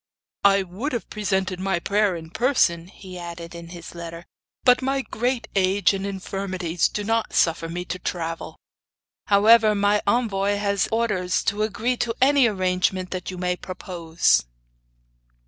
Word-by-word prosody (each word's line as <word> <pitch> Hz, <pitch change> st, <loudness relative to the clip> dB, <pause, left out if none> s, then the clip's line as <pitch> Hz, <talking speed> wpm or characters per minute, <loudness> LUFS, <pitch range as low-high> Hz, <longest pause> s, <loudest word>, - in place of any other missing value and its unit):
'I 200 Hz, -1 st, +5 dB
would 200 Hz, +11 st, -5 dB
have 240 Hz, -, -4 dB
presented 190 Hz, -3 st, -1 dB
my 190 Hz, -1 st, 0 dB
prayer 200 Hz, +2 st, +1 dB
in 160 Hz, -1 st, -9 dB
person, 205 Hz, -8 st, +2 dB
he 185 Hz, -1 st, -11 dB
added 170 Hz, -1 st, -8 dB
in 170 Hz, 0 st, -9 dB
his 170 Hz, -1 st, -10 dB
letter, 170 Hz, 0 st, -8 dB, 0.4 s
'but 250 Hz, +1 st, +5 dB
my 270 Hz, +1 st, 0 dB
great 245 Hz, +2 st, -2 dB
age 195 Hz, 0 st, +3 dB
and 195 Hz, 0 st, -3 dB
infirmities 190 Hz, -3 st, -2 dB
do 210 Hz, -, -4 dB
not 225 Hz, +1 st, -1 dB
suffer 165 Hz, 0 st, +2 dB
me 175 Hz, +1 st, -4 dB
to 180 Hz, 0 st, -5 dB
travel; 165 Hz, -2 st, -4 dB, 0.7 s
however 215 Hz, +1 st, +6 dB
my 205 Hz, +1 st, +2 dB
envoy 205 Hz, -3 st, +1 dB
has 200 Hz, -2 st, 0 dB
orders 205 Hz, -6 st, 0 dB
to 205 Hz, +1 st, 0 dB
agree 220 Hz, +4 st, -1 dB
to 230 Hz, -1 st, -1 dB
any 275 Hz, -1 st, +5 dB
arrangement 185 Hz, -2 st, 0 dB
that 185 Hz, -1 st, -4 dB
you 185 Hz, -, -6 dB
may 180 Hz, 0 st, -1 dB
propose. 175 Hz, -, 0 dB
195 Hz, 150 wpm, -23 LUFS, 180-215 Hz, 0.7 s, however